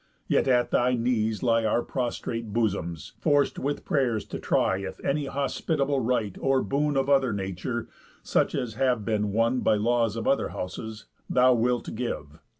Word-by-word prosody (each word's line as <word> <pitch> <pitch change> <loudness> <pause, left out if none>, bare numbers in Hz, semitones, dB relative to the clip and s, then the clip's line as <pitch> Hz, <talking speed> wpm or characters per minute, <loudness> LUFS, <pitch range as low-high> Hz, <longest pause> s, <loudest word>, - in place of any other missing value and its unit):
Yet - - +2
at 125 -2 +3
thy 125 +1 +3
knees 115 -2 0
lie 115 -2 +3
Our 115 +2 +1
prostrate 115 -3 -3
bosoms, 95 -8 -2
forc'd 145 -1 +2
with 145 +2 -3
pray'rs 120 -7 +1
to - - -5
try 95 - +1
If 100 - -6
any 140 0 0
hospitable 140 +1 -1
right, 115 -5 0
or 135 -1 +2
boon 145 +1 0
Of 135 0 +1
other 135 -3 +3
nature, 100 +4 -3 0.4
such - - +1
as 120 -3 -2
have 125 -2 +1
been 105 -2 0
won 115 +4 +2
By - - +3
laws 115 0 +1
of 115 - -3
other 135 - +2
houses, 110 +4 -6 0.2
thou 125 0 +5
wilt 120 +1 0
give. 75 -11 -5
120 Hz, 165 wpm, -26 LUFS, 110-130 Hz, 0.4 s, thou